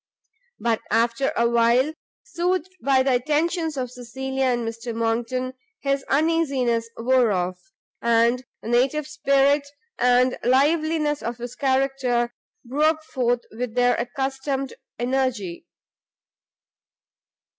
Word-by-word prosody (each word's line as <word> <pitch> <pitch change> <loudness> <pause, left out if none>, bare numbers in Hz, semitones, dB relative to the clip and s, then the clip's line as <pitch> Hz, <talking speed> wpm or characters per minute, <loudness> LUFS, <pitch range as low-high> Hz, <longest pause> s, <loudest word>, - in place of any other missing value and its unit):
But, 230 -2 0
after 230 +4 +1
a 235 - +3
while, 235 +5 +3 0.3
soothed 365 +1 -2
by 265 -1 +4
the 265 -1 +2
attentions 310 +4 0
of 250 -2 -3
Cecilia 265 +2 -3
and 240 -2 0
Mr 230 +1 -5
Monckton, 240 +3 -1 0.3
his 275 -1 0
uneasiness 275 -7 +1
wore 245 -1 +3
off, 180 -1 -1 0.4
and 235 +2 +3 0.2
the 225 - -5
native 265 +5 +2
spirit 280 0 +2 0.3
and 250 +1 +3
liveliness 300 +3 +2
of 235 0 -4
his 245 0 -6
character 260 -3 0 0.3
broke 305 +5 +1
forth 245 -5 0
with 230 +1 -5
their 245 0 +4
accustomed 270 +2 -2 0.2
energy. 245 - -1
255 Hz, 110 wpm, -24 LUFS, 235-275 Hz, 0.4 s, by